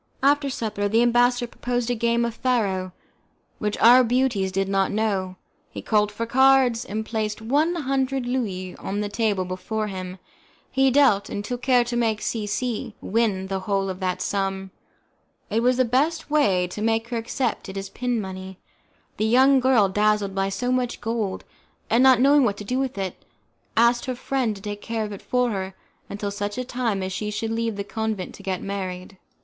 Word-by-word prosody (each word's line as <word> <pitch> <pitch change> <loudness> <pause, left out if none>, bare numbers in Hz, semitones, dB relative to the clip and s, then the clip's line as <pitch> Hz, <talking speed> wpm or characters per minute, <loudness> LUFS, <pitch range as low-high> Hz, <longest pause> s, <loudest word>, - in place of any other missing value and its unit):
After 285 0 +3
supper, 215 -5 -2
the 225 +3 +3
ambassador 245 +1 +3
proposed 245 0 -2
a - - +2
game 235 0 +1
of 235 - -3
faro, 200 -7 0 0.7
which 210 0 -2
our 245 +3 +7
beauties 235 -5 +1
did 195 +1 0
not 195 0 +1
know; 200 -4 -1 0.3
he - - -8
called 210 -1 +2
for 230 +2 -3
cards, 260 -1 +4
and 215 +2 -4
placed 215 -2 -2
one 290 +10 +1
hundred 270 -3 -1
Louis 200 -8 -3
on 205 +2 -3
the 205 - -2
table 200 -2 0
before 185 +4 -3
him; 185 -1 -6 0.5
he 270 0 +3
dealt, 255 -7 +3
and 205 - -4
took 245 +1 -4
care 250 -1 +4
to 240 0 -4
make 225 -3 +1
C 215 -2 -3
C 220 0 -3
win 205 -3 0
the 190 0 -3
whole 195 0 -1
of 185 - -8
that 185 -1 -2
sum. 195 -1 -2 0.8
It 225 +2 +1
was 250 +1 +3
the 255 - +3
best 290 +7 0
way 200 -12 +3
to 210 - -6
make 225 +1 0
her 240 - -2
accept 230 -1 -2
it 190 - -7
as 195 0 -5
pin 245 +1 -2
money. 190 -1 -7 0.6
The 215 - 0
young 265 +4 +5
girl, 250 -6 +4
dazzled 210 0 +1
by 195 0 0
so 245 +6 -2
much 250 -1 -1
gold, 225 -4 -2 0.5
and 230 - +4
not 260 -2 +6
knowing 280 +2 +5
what 205 -4 +1
to - - -7
do 250 +6 -1
with 265 -4 -2
it, 190 -2 -4 0.5
asked 235 +1 +4
her 255 - -3
friend 250 -3 -1
to 195 - -12
take 205 -1 -5
care 225 -1 -2
of 210 - -7
it 200 - -8
for 250 -1 0
her 190 -2 -4 0.3
until 200 0 -4
such 205 0 -3
time 235 -6 -1
as 185 0 -3
she 210 +2 -3
should 220 +2 -3
leave 230 -1 -1
the 200 - -3
convent 215 -2 -3
to - - -12
get 190 -2 -3
married. 190 -1 -5
220 Hz, 195 wpm, -24 LUFS, 195-245 Hz, 0.8 s, our